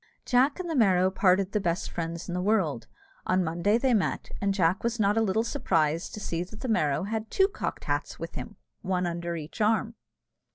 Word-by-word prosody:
Jack 265 +5 +3
and 365 - -4
the 330 - -2
Merrow 190 -6 +4
parted 190 0 +3
the 210 - +1
best 175 -2 -1
friends 170 0 -4
in 175 - -4
the 180 - -1
world. 180 - +1 0.4
On 185 0 +2
Monday 175 +6 +1
they 255 +1 +2
met, 210 -4 0
and 200 0 +2
Jack 185 -1 +1
was 235 0 -1
not 205 0 +3
a 225 - +3
little 220 +1 +1
surprised 165 - 0
to - - -6
see 170 -4 -3
that 210 +4 -12
the 260 - -3
Merrow 150 - +1
had 220 +2 -3
two 385 - +3
cocked 405 - -5
hats - - -2
with - - -7
him, - - -7 0.3
one 180 -1 -1
under 170 0 -3
each 160 +7 -7
arm. 220 +1 +2
195 Hz, 210 wpm, -28 LUFS, 170-220 Hz, 0.4 s, Merrow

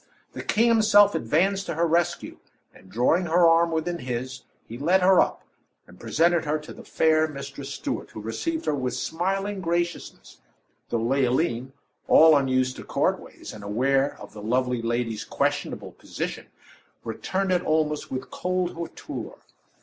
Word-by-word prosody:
The - - -6
king 230 +2 +2
himself 215 -3 +5
advanced 190 - +1
to - - -3
her 170 +2 +2
rescue, 170 +1 -1 0.3
and 95 - -18
drawing 125 - +2
her 170 +1 +5
arm 165 +1 +4
within 165 +2 -2
his, 125 +1 -5 0.3
he 115 - -8
led 170 +9 +2
her 190 0 +6
up - - -2 0.4
and 90 - -17
presented 165 +8 +2
her 150 0 0
to 150 0 -10
the - - -12
fair 155 0 +2
Mistress 140 -1 -8
Stuart, - - -4
who - - -9
received 315 - -3
her - - +1
with 125 -3 -2
smiling 195 +7 -2
graciousness 175 0 -3 0.5
though 115 - 0
Leoline, 130 0 0 0.3
all 160 -1 +7
unused 130 -2 +1
to - - -8
court - - 0
ways, - - -11
and 105 - -10
aware 135 +7 0
of - - -11
the 105 - -9
lovely 125 +2 0
lady's 115 -2 -2
questionable - - -2
position, - - -6 0.6
returned 190 - -2
it 180 -1 +2
almost 155 -1 0
with 130 0 -5
cold 180 -1 -1
hauteur. 165 -1 -7
155 Hz, 155 wpm, -25 LUFS, 125-175 Hz, 0.6 s, all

